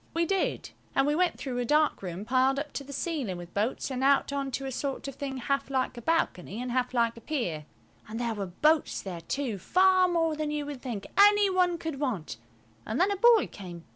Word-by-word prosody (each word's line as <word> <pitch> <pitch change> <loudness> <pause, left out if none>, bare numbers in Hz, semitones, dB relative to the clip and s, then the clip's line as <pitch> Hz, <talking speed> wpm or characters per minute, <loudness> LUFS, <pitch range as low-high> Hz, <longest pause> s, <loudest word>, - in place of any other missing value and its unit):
We 335 0 +2
did, 390 +2 -1 0.2
and 270 - +4
we 295 - +2
went 360 +3 +1
through 250 -3 -4
a - - 0
dark 300 +5 +2
room 185 +1 -5
piled 260 +3 +2
up 295 +1 -4
to 280 - -4
the 280 - -11
ceiling 280 - -3
with 175 0 -10
boats 220 +6 -1
and 260 0 -2
out 280 +1 +3
on 275 -1 -2
to 270 - -3
a 265 - -3
sort 275 +1 -3
of 275 - -5
thing 270 0 -5
half 275 +2 -1
like 260 -2 -1
a 240 - -8
balcony 230 - -1
and 250 0 -3
half 250 0 -1
like 235 -1 +2
a - - -10
pier. 180 - -3 0.4
And 220 +2 -5
there 235 -1 -1
were 200 -3 -4
boats 305 - +1
there 180 -4 -6
too, 230 +3 -3
far 370 - +4
more 330 -3 +1
than 305 0 -2
you 295 -1 -2
would 285 -3 -7
think 230 -7 -5
any 410 -1 +6
one 360 -2 +2
could 320 -4 -5
want; 225 - -3 0.5
an 220 - -3
then 380 +6 +3
a - - +1
boy 460 +2 +5
came. 175 -4 -10
270 Hz, 230 wpm, -28 LUFS, 230-310 Hz, 0.5 s, any